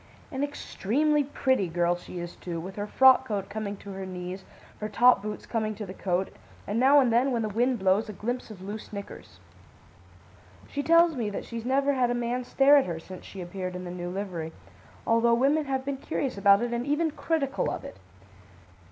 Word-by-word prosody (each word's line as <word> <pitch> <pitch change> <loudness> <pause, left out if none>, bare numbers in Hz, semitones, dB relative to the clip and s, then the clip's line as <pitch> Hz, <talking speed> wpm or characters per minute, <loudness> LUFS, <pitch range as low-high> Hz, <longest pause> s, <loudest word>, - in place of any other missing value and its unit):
"An 265 +1 -2
extremely 290 +1 0
pretty 260 -7 0
girl 175 +1 +1
she 175 +1 -10
is, 175 0 -6
too, 170 -2 -5
with 185 +3 -7
her 205 0 -4
frock 260 +3 +6
coat 200 -3 -3
coming 205 -1 -4
to 200 - -10
her 190 0 -6
knees, 185 0 -6 0.4
her 215 - -3
top 245 -1 +5
boots 210 +1 -6
coming 215 -2 -2
to 210 - -6
the 185 - -8
coat, 190 -1 -1 0.3
and 205 +3 -1
now 275 +3 +6
and 250 -4 +3
then, 255 +4 +3
when 235 -2 0
the 215 - -1
wind 245 +4 +1
blows, 195 +2 +2
a - - -5
glimpse 240 +5 -4
of 195 -4 -10
loose 205 +2 -7
knickers. 200 -1 -9 1.3
She 285 - -3
tells 335 +1 +5
me 230 -5 -1
that 200 - -5
she's 230 -1 -6
never 275 +2 +2
had 255 -2 +2
a 245 - 0
man 240 +1 -1
stare 275 +3 +5
at 275 - +3
her 170 -2 -3
since 185 +2 -10
she 195 - -8
appeared 185 +1 -5
in 180 - -5
the 175 - -6
new 175 0 -5
livery, 180 -4 -4 0.5
although 230 +1 +4
women 285 +5 +2
have 265 -1 -2
been 280 -1 -2
curious 270 0 -3
about 200 +2 +5
it 240 0 -2
and 235 0 -1
even 310 +2 +1
critical 290 -3 -1
of - - -5
it. - - -9
220 Hz, 210 wpm, -27 LUFS, 190-265 Hz, 1.3 s, frock